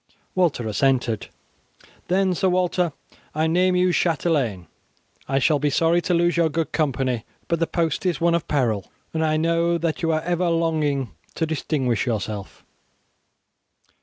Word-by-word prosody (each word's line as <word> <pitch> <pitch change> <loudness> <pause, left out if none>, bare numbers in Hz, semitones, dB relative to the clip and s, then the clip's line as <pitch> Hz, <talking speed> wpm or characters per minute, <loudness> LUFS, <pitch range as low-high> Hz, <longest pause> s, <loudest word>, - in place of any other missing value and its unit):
Walter 165 -11 +1
assented. 120 +1 +1 0.8
"Then, 190 +1 +2
Sir 185 +2 +1
Walter, 180 -1 +1 0.4
I 155 +1 +1
name 180 +3 +2
you 180 0 +3
chatelain. 145 - 0 0.6
I 135 - 0
shall 145 +2 +3
be 150 +1 +1
sorry 165 +4 +2
to 175 - 0
lose 175 +1 +2
your 165 -1 +3
good 160 +1 -2
company; 130 -6 0 0.2
but 170 - 0
the 165 - +1
post 165 -4 -1
is 175 - 0
one 170 0 +3
of 170 -2 0
peril, 115 -9 0 0.2
and 160 0 0
I 155 -1 +2
know 170 +1 +2
that 165 -1 -2
you 165 -1 +1
are 155 0 +1
ever 175 +1 0
longing 155 -5 0 0.2
to 165 - 0
distinguish 135 -7 -1
yourself. 105 -3 -4
160 Hz, 155 wpm, -23 LUFS, 135-170 Hz, 0.8 s, you